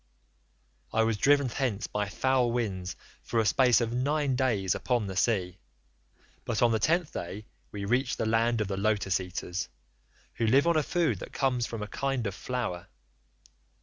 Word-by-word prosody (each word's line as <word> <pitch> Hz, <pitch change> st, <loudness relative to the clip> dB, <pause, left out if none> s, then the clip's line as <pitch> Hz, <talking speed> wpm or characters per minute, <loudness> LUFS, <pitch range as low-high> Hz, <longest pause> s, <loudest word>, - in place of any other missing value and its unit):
"I 115 Hz, -, +3 dB
was 110 Hz, -1 st, +1 dB
driven 140 Hz, +6 st, +4 dB
thence 120 Hz, -4 st, -1 dB
by 105 Hz, -1 st, -2 dB
foul 125 Hz, +4 st, +1 dB
winds 95 Hz, -6 st, -2 dB, 0.3 s
for 115 Hz, -, -1 dB
a 110 Hz, -, +2 dB
space 125 Hz, +2 st, +4 dB
of 115 Hz, 0 st, -1 dB
nine 140 Hz, +2 st, +1 dB
days 110 Hz, -8 st, +1 dB
upon 120 Hz, -4 st, 0 dB
the 95 Hz, -1 st, -5 dB
sea, 95 Hz, -3 st, 0 dB, 0.8 s
but 115 Hz, 0 st, 0 dB
on 120 Hz, -, +5 dB
the 110 Hz, -, +1 dB
tenth 170 Hz, +5 st, +1 dB
day 100 Hz, +5 st, -6 dB, 0.3 s
we 100 Hz, -1 st, -5 dB
reached 125 Hz, +4 st, +1 dB
the -, -, -1 dB
land 115 Hz, +1 st, +2 dB
of 105 Hz, -, -1 dB
the 95 Hz, 0 st, -3 dB
Lotus 100 Hz, -2 st, +1 dB
eaters, 90 Hz, 0 st, -4 dB, 0.7 s
who 115 Hz, -, +1 dB
live 135 Hz, +7 st, +5 dB
on 170 Hz, -1 st, +3 dB
a 155 Hz, -, +4 dB
food 170 Hz, +2 st, 0 dB
that -, -, -9 dB
comes 125 Hz, -3 st, 0 dB
from 115 Hz, -2 st, -5 dB
a -, -, -5 dB
kind 135 Hz, 0 st, -2 dB
of 100 Hz, -, -2 dB
flower. 115 Hz, -6 st, -4 dB
115 Hz, 180 wpm, -29 LUFS, 100-130 Hz, 0.8 s, on